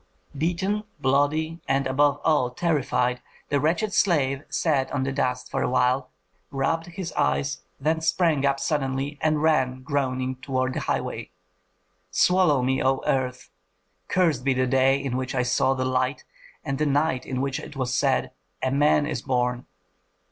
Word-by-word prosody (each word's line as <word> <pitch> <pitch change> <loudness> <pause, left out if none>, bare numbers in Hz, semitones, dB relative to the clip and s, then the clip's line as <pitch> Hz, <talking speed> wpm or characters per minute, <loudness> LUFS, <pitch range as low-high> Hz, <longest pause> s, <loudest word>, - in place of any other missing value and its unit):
Beaten, 180 +7 -1 0.2
bloody, 150 +5 +1
and 135 0 +1
above 145 +2 +2
all 150 -6 +3
terrified, 125 -4 0 0.3
the 145 - +2
wretched 175 +8 0
slave 140 -7 +2
sat 140 -5 0
on 130 -1 -1
the 135 0 -2
sand 125 -2 +1
for - - -2
a - - 0
while, 125 +1 +1 0.4
rubbed 165 +5 -1
his 175 -2 -6
eyes, 70 +1 0 0.2
then 160 +3 0
sprang 160 -3 +2
up 140 -1 +2
suddenly 140 0 -2
and 155 -1 +1
ran 130 -5 +1
groaning 130 -3 -1
toward 130 -1 -1
the - - -2
highway, - - -3 0.8
"Swallow 155 - +3
me, 130 +1 +1
O 135 0 +1
earth! 130 -1 -1 0.6
Cursed 165 -9 +1
be 135 -1 +2
the 130 0 +2
day 135 +1 +3
in 130 -3 -2
which 130 0 -3
I 125 - +2
saw 130 +2 +2
the 130 -1 -1
light, 130 +2 0 0.4
and 135 -1 -2
the 150 - +2
night 145 -2 +1
in 130 -1 -2
which 135 0 -1
it - - -10
was 130 -2 -2
said, 135 -1 +1 0.3
'A 130 - +1
man 145 +1 +3
is - - -3
born!' 125 -2 -1
135 Hz, 160 wpm, -25 LUFS, 130-150 Hz, 0.8 s, all